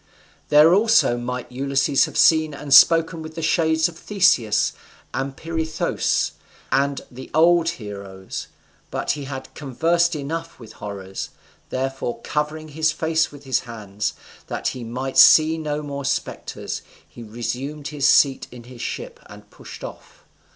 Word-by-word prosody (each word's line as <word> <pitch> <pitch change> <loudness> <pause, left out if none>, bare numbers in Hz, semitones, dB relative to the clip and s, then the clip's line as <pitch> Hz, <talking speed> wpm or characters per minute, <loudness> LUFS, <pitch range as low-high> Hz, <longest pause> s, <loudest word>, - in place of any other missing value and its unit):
There 150 +3 +7
also 220 - +4
might 125 +1 -5
Ulysses 135 +1 +2
have - - -7
seen 155 -2 +4
and 140 -1 -2
spoken 165 +3 +6
with 160 0 -9
the 165 - -5
shades 160 0 +2
of 170 -1 -11
Theseus, 180 - +2 0.4
and 135 0 -3
Pirithous, 160 -1 -1 0.4
and 140 0 +1
the 130 +1 -10
old 165 +1 +4
heroes; 100 -3 -7 0.4
but - - -1
he 145 -2 -4
had 130 -1 -7
conversed 165 +5 +1
enough 165 +3 -5
with 110 -3 -12
horrors; 95 -2 -7 0.4
therefore, 135 -1 -3
covering 155 +1 -3
his 155 +1 +1
face 160 0 0
with 145 -1 -13
his 130 -2 +1
hands, 105 -3 -5 0.3
that - - -2
he 125 - -7
might 130 +3 -2
see 160 +1 +7
no 150 -1 -3
more 140 -1 -5
spectres, 140 +1 -3 0.3
he - - -13
resumed 125 +6 -5
his 145 -2 0
seat 140 -2 +4
in 125 -1 -11
his 120 0 -12
ship, 485 0 -5
and - - -14
pushed - - -12
off. - - -11
140 Hz, 145 wpm, -22 LUFS, 125-160 Hz, 0.4 s, There